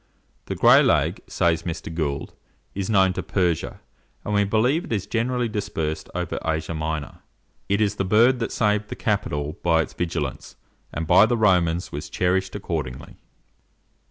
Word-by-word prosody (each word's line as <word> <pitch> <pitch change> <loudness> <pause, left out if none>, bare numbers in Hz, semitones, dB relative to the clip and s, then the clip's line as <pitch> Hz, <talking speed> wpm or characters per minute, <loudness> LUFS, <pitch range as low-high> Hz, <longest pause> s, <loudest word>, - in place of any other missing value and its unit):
"The - - -4
Gray - - +7
lag," - - +2
says 80 -1 +1
Mr. 85 -1 -5
Gould, 75 -4 -3 0.4
"is 100 0 -3
known 95 -3 +4
to - - -3
Persia, 90 -5 -1 0.5
and 105 - -2
we 105 0 +3
believe 120 - +1
it - - -11
is 100 -4 -1
generally 120 +1 -1
dispersed 80 -8 -3
over 90 -2 -2
Asia 80 0 -2
Minor." 80 -2 -4 0.5
It 100 +2 +2
is 105 0 +1
the - - 0
bird 115 +6 +4
that 115 - -2
saved 105 -1 +1
the - - -5
Capitol 75 +4 -2
by 80 -2 +3
its - - -11
vigilance, 80 -6 -4 0.4
and 80 - -3
by 110 +7 +6
the 120 - +1
Romans 90 -5 +2
was 75 - -6
cherished 95 +2 0
accordingly. 80 -10 -5
90 Hz, 160 wpm, -23 LUFS, 80-105 Hz, 0.5 s, Gray